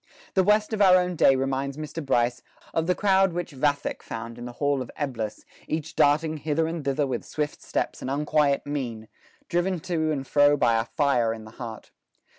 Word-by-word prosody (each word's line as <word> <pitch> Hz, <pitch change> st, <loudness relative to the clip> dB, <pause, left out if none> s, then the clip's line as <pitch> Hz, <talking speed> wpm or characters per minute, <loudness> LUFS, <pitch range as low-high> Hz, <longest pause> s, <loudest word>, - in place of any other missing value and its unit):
'" -, -, -24 dB
The 190 Hz, -, +4 dB
West 210 Hz, +3 st, +3 dB
of 210 Hz, -, 0 dB
our 185 Hz, -2 st, +7 dB
own 180 Hz, 0 st, 0 dB
day 135 Hz, -4 st, +5 dB
reminds 135 Hz, +1 st, -2 dB
Mr. 155 Hz, +1 st, -5 dB
Bryce 120 Hz, -3 st, +1 dB, 0.3 s
"of 165 Hz, 0 st, 0 dB
the 180 Hz, -, +2 dB
crowd 195 Hz, -3 st, +3 dB
which 175 Hz, -1 st, -3 dB
Vathek 145 Hz, +1 st, -1 dB
found 115 Hz, +1 st, -7 dB
in 120 Hz, -, -6 dB
the 120 Hz, -, -7 dB
hall 140 Hz, 0 st, 0 dB
of 125 Hz, -, -6 dB
Eblis, 115 Hz, -7 st, -4 dB, 0.2 s
each 155 Hz, 0 st, -3 dB
darting 155 Hz, +2 st, +3 dB
hither 155 Hz, +2 st, 0 dB
and 165 Hz, -1 st, -4 dB
thither 140 Hz, +1 st, +1 dB
with 130 Hz, -, -3 dB
swift 150 Hz, -1 st, -4 dB
steps -, -, -3 dB
and -, -, -4 dB
unquiet 145 Hz, 0 st, +1 dB
mien, 120 Hz, -7 st, -4 dB, 0.4 s
driven 175 Hz, +1 st, 0 dB
to 165 Hz, -3 st, -1 dB
and 135 Hz, -3 st, -2 dB
fro 145 Hz, +1 st, +4 dB
by 115 Hz, -4 st, +3 dB
a 115 Hz, -, -1 dB
fire 125 Hz, -6 st, +1 dB
in 110 Hz, -1 st, -10 dB
the 110 Hz, -, -12 dB
heart. 115 Hz, -2 st, -8 dB
145 Hz, 205 wpm, -26 LUFS, 130-165 Hz, 0.4 s, our